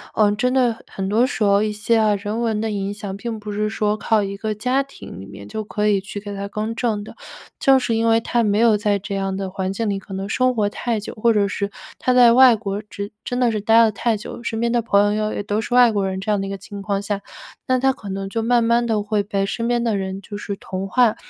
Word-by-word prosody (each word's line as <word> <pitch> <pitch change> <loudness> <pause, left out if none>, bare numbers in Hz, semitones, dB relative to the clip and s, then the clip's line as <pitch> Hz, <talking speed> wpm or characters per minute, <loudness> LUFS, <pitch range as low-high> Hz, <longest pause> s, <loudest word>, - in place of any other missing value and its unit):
呃， 215 -1 +4
真 250 +4 0
的 250 -3 +2
很 190 0 -4
多 220 +5 +3
时 260 - -6
候， 200 0 +4
一 215 - 0
些 215 +2 0
啊 215 -2 +3
人 205 +3 -3
文 225 -2 0
的 220 +1 -1
影 200 -1 -2
响 200 -1 -6
并 225 +2 -5
不 210 0 -7
是 210 +1 -1
说 210 -1 0
靠 215 0 +1
一 200 0 -4
个 215 +1 -3
家 250 +6 +1
庭 270 - -11
里 - - -9
面 100 +1 -11
就 215 - -4
可 210 0 -1
以 200 -2 +2
去 200 +1 -7
给 205 0 -7
他 200 0 -4
更 215 +2 -3
正 225 -3 -1
的。 - - -11 0.4
就 270 -1 +5
是 235 -3 -1
因 225 +1 +1
为 225 0 +4
他 235 +1 0
没 205 -1 +1
有 230 -2 +5
在 205 -1 +1
这 200 +1 -5
样 195 -1 -2
的 195 -1 -3
环 190 0 -2
境 220 +2 -2
里 200 -1 -1
可 195 - -16
能 195 +1 -4
生 255 +4 +2
活 210 -3 +2
太 230 +1 -2
久， 205 - -7
或 230 +1 +2
者 205 -2 +2
是 200 +1 -3 0.3
他 255 - +1
在 245 -2 +7
外 255 -1 +7
国 205 -1 -4
直 205 -1 -7
真 245 - -3
的 245 -2 +3
是 215 -2 -2
待 225 +2 +4
了 220 - +3
太 220 +1 0
久， 210 - -8
身 225 -1 -3
边 235 0 +1
的 240 -1 +2
朋 205 -3 +3
友 215 0 0
又 - - -3
也 - - -3
都 205 +1 -1
是 225 - -5
外 245 -2 +7
国 200 -1 0
人 190 0 -4
这 195 - -5
样 205 - +1
的 195 - -3
一 - - -5
个 195 - -4
情 200 +1 -9
况 200 -1 -1
下， 200 0 -3 0.5
那 255 - +3
他 265 +1 +3
可 205 - -10
能 195 0 -4
就 225 +4 -2
慢 240 +1 +3
慢 235 +1 +2
地 220 -2 +1
会 210 0 0
被 195 -1 -1
身 230 +3 -2
边 240 -1 +1
的 230 -3 +1
人 190 0 -3
就 205 - -9
是 205 0 -4
同 190 0 -5
化。 240 0 +3
210 Hz, 305 characters per minute, -21 LUFS, 200-230 Hz, 0.5 s, 在